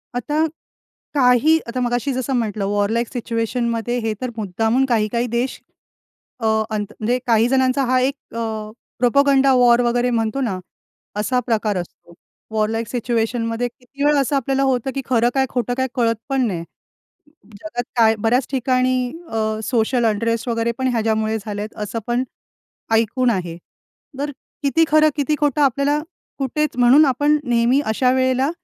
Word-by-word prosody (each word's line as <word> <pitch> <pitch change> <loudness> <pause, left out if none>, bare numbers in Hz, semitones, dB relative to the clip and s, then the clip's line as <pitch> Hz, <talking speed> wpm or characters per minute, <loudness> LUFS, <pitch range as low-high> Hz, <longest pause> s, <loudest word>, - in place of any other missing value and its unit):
आता 295 +6 0 0.7
काही, 275 +3 +4
आता 245 +2 -3
मगाशी 245 +2 0
जसं 260 +1 -2
म्हटलं, 215 -4 -1
वॉर 205 0 0
लाइक 235 +1 0
सिच्युएशनमध्ये 235 0 -2
हे 220 - 0
तर 255 - -2
मुद्दामून 220 +6 +1
काही 225 -5 +1
काही 240 +1 0
देश 240 +3 -2 0.8
अ, 225 - -3 0.2
अंत 210 -2 -2
म्हणजे 235 +3 +1
काही 230 0 +4
जणांचा 260 0 +2
हा 255 +1 +2
एक 270 +2 +1 0.2
अ, 220 -2 -4 0.3
प्रोपगंडा 270 +2 +4
वॉर 245 -1 +5
वगैरे 240 +1 +1
म्हणतो 230 +2 -1
ना, 195 -8 -2 0.6
असा 250 +4 +1
प्रकार 215 -4 0
असतो. 175 -1 -8 0.4
वॉर 215 -1 +1
लाइक 225 0 -2
सिच्युएशनमध्ये 230 0 -1
किती 250 +3 -9
वेळ 295 0 +4
असं 280 +1 +1
आपल्याला 270 0 0
होतं, 265 -1 0
की 275 - -1
खरं 240 -1 +2
काय? 270 -1 +2
खोटं 245 -1 -1
काय? 260 0 +1
कळत 230 -2 +2
पण 270 -2 +1
नाही. 175 -5 -3 1.0
जगात 240 -5 +1
बऱ्याच 240 +4 +1
ठिकाणी 255 -1 +1 0.2
अ, 220 -1 -1
सोशल 240 +1 +1
अनरेस्ट 230 +2 0
वगैरे 230 0 0
पण 260 - +1
ह्याच्यामुळे 220 -1 0
झाले 205 -1 -5
आहेत, 215 +1 -7
असं 220 +2 -4
पण 240 +1 +1 0.7
ऐकून 230 +3 +2
आहे. 175 -6 -2 0.6
तर 290 +1 -2 0.3
किती 285 +4 +3
खरं 310 0 +5
किती 300 +1 +1
खोटं 295 0 +2
आपल्याला 280 +2 +2 0.4
कुठेच, 295 +2 -1
म्हणून 250 +5 +6
आपण 290 +3 +2
नेहमी 240 +2 +2
अशा 235 +4 +2
वेळेला 260 +2 +2
245 Hz, 155 wpm, -20 LUFS, 225-265 Hz, 1.0 s, म्हणून